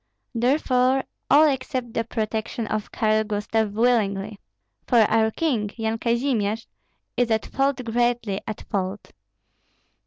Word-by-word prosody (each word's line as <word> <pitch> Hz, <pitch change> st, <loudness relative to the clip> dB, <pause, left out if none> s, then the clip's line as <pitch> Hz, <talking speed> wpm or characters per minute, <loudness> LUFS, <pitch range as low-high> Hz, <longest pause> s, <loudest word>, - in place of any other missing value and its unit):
Therefore 255 Hz, +1 st, +2 dB, 0.3 s
all 305 Hz, +2 st, +7 dB
accept 255 Hz, -3 st, -2 dB
the 230 Hz, -, 0 dB
protection 220 Hz, 0 st, -3 dB
of 215 Hz, 0 st, -3 dB
Karl 215 Hz, -1 st, +2 dB
Gustav 210 Hz, 0 st, -1 dB
willingly. 210 Hz, -3 st, +1 dB, 0.5 s
For 240 Hz, -3 st, +5 dB
our 220 Hz, +1 st, +3 dB
king, 225 Hz, -6 st, -1 dB
Yan 225 Hz, 0 st, -1 dB
Kazimir, 235 Hz, -3 st, +1 dB, 0.6 s
is 245 Hz, -1 st, +1 dB
at 220 Hz, -1 st, +1 dB
fault, 270 Hz, -1 st, 0 dB
greatly 235 Hz, -3 st, 0 dB
at 215 Hz, -, -5 dB
fault. 195 Hz, +1 st, -3 dB
225 Hz, 120 wpm, -24 LUFS, 215-250 Hz, 0.6 s, all